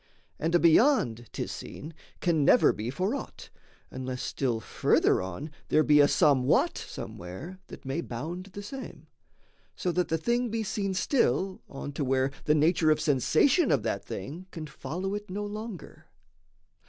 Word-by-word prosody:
And 165 +2 0
a - - +6
beyond 165 - +4
'tis - - -4
seen 155 +3 -8 0.3
can 165 -4 +2
never 245 - +5
be 110 +3 -4
For 185 - -1
aught, 280 - -7 0.4
unless 130 -1 -5
still 125 -5 -1
further 110 - +2
on 95 - -6 0.2
there 155 - +4
be 150 -1 +5
A 145 - +7
somewhat 135 -4 +3
somewhere 115 - -8
that - - -11
may 135 +5 -2
bound 165 +8 -5
the 200 +1 -9
same 265 +6 -8 0.7
So 180 - -1
that 180 +1 0
the 165 - 0
thing 240 +8 0
be 225 0 -2
seen 195 -2 -2
still 190 - +1
on 140 +1 -6
to 145 +1 -3
where 130 0 +1
The 150 - +4
nature 155 +1 +3
of 155 0 +3
sensation 155 - +3
of 135 -7 +2
that 100 - -2
thing 155 - -7
Can 160 -3 -7
follow 180 +6 -5
it 205 -1 -5
no 205 +3 -3
longer. 205 -7 -8
160 Hz, 165 wpm, -28 LUFS, 135-195 Hz, 0.7 s, A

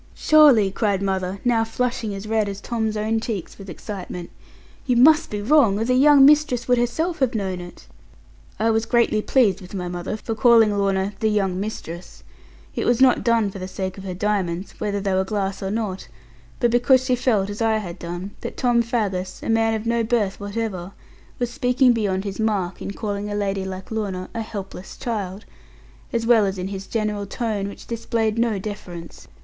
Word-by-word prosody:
'Surely,' 280 -11 +5
cried 200 -1 0
mother, 190 -1 -2
now 235 -2 +3
flushing 230 -1 -2
as 195 +1 -7
red 215 -2 +1
as 195 0 -6
Tom's 220 -1 -2
own 220 +1 0
cheeks 215 -5 -5
with 195 -1 -9
excitement, 180 -1 -7 0.6
'you 250 - +3
must 305 +6 +5
be 205 -1 -4
wrong, 240 -5 +4
or 225 - -1
the 255 - +2
young 275 +1 +7
mistress 290 -5 +4
would 245 -1 +3
herself 320 +9 -1
have 260 -4 +1
known 190 -4 -2
it.' 175 0 -11 0.7
I 225 +1 +2
was 225 0 0
greatly 235 -3 +2
pleased 210 -6 +2
with 185 +2 -10
my 180 -2 -3
mother, 175 +4 -4
for 225 - -4
calling 225 -2 +5
Lorna 195 0 0
'the 220 - +1
young 195 -3 0
mistress'; 185 -4 -7 0.5
it - - -1
was 240 0 +3
not 260 -2 +5
done 230 -4 +2
for 195 - -8
the 185 - -5
sake 190 0 -4
of - - -9
her 185 -2 -5
diamonds, 190 -2 -2
whether 205 -1 -1
they 195 -1 -1
were 190 0 +2
glass 195 -1 -3
or 195 - -2
not; 205 -3 -3 0.5
but 240 - +2
because 255 +2 +4
she 255 -1 +2
felt 235 -6 +1
as 205 - -6
I 225 -1 +2
had 180 -4 -6
done, 175 +3 -6
that - - -6
Tom 240 -2 +3
Faggus, 200 -6 -2
a - - -4
man 225 0 +2
of 220 +1 -4
no 230 0 +1
birth 215 -4 0
whatever, 200 -3 -4 0.4
was 245 -1 -2
speaking 250 -1 +3
beyond 200 -4 -1
his 200 0 -5
mark, 200 -5 -1
in - - -4
calling 205 0 -4
a 205 - -3
lady 195 -2 -1
like 190 +1 -7
Lorna 195 -4 -3
a 230 - -3
helpless 195 -4 -8
child; 210 -5 -4 0.7
as 230 -1 -1
well 225 -4 +5
as 195 0 -3
in 185 +1 -4
his 195 -1 -6
general 210 -2 -2
tone, 210 -2 -2
which 200 - -10
displayed 230 -1 -1
no 230 -3 +1
deference. 185 -4 -8
210 Hz, 200 wpm, -22 LUFS, 195-235 Hz, 0.7 s, young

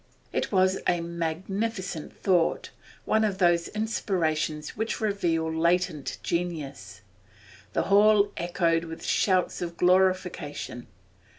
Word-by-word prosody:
It - - -1
was 190 -1 +3
a 175 - +2
magnificent 175 +2 -3
thought, 175 -4 +2 0.3
one 220 0 +2
of 205 -3 0
those 175 -2 +3
inspirations 165 -8 -1
which 220 +2 -2
reveal 170 -7 0
latent 170 -2 0
genius. 155 - -4 0.7
The - - +1
hall 205 0 +5
echoed 170 -1 0
with 165 0 -8
shouts 185 -2 +1
of 170 -1 -5
glorification. 180 -8 +1
175 Hz, 105 wpm, -27 LUFS, 165-195 Hz, 0.7 s, hall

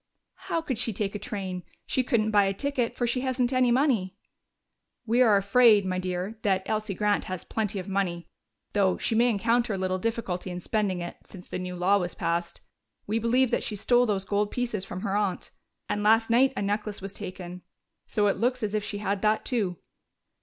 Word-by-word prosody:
"How 330 - 0
could 260 -7 -2
she 230 -2 0
take 200 0 -2
a 205 - -4
train? 190 -3 -4 0.2
She 260 - +1
couldn't 220 -4 +1
buy 205 -1 +5
a 195 0 -1
ticket, 260 0 -1
for 245 - +1
she 240 +2 0
hasn't 255 -1 0
any 255 -1 +3
money." 235 -8 +2 0.9
"We 235 +2 +3
are 220 -5 +6
afraid, 205 +1 +5
my 185 -1 -1
dear, 185 +4 -3
that 190 -2 +1
Elsie 215 -2 -2
Grant 210 0 +1
has 185 -2 -5
plenty 215 -2 -2
of 185 0 -5
money, 185 -3 -2 0.5
though 195 -3 +2
she - - -1
may 235 +2 +4
encounter 230 +1 +1
a - - -3
little 185 0 -1
difficulty 195 -4 -2
in 180 0 -4
spending 190 -1 -1
it, 175 - -6
since 180 -2 -11
the - - -4
new 180 0 -5
law 190 +3 +3
was 180 -2 -3
passed. 170 0 -2 0.4
We 220 +2 0
believe 245 +2 +2
that - - +1
she 215 - -3
stole 240 +4 +3
those 195 -2 -1
gold 205 +1 0
pieces 235 -5 -2
from 185 -1 -6
her 200 -2 -1
aunt 205 -3 -1 0.4
and 205 - -1
last 225 +2 +4
night 260 +3 +4
a - - 0
necklace 205 +1 -2
was 195 0 -7
taken, 180 -3 -7 0.5
so 210 - +1
it 200 - +2
looks 250 +1 0
as 210 -1 -1
if 215 -1 0
she 205 - -4
had 200 -1 -2
that 215 0 +2
too." 200 -8 0
205 Hz, 210 wpm, -27 LUFS, 190-230 Hz, 0.9 s, are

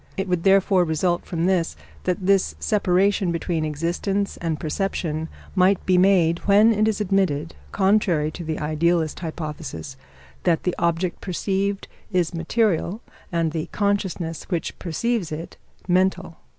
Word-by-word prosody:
It 195 0 -1
would 180 -2 0
therefore 195 0 +4
result 175 +2 0
from 170 -2 -1
this 180 -3 +1 0.3
that 180 0 -1
this 195 -1 +3
separation 195 -2 +2
between 165 -1 -1
existence 170 +6 -1
and 160 -3 -2
perception 160 -2 -2 0.2
might 185 0 +3
be 185 - +3
made, 180 -3 +4
when 210 +3 +6
it 215 0 +2
is 220 -1 0
admitted 185 -6 0 0.2
(contrary 190 -6 +2
to 175 - -7
the 160 -1 -3
idealist 155 +1 0
hypothesis) 155 - -6 0.4
that 165 - +1
the 180 - 0
object 170 +1 0
perceived 195 +2 -2 0.2
is 180 -2 +1
material 195 +3 0 0.3
and 165 -2 0
the 155 -1 -3
consciousness 190 -5 -1
which 175 -4 -3
perceives 190 +2 -1
it 160 +2 -6 0.3
mental. 185 -2 +1
180 Hz, 135 wpm, -23 LUFS, 165-195 Hz, 0.4 s, when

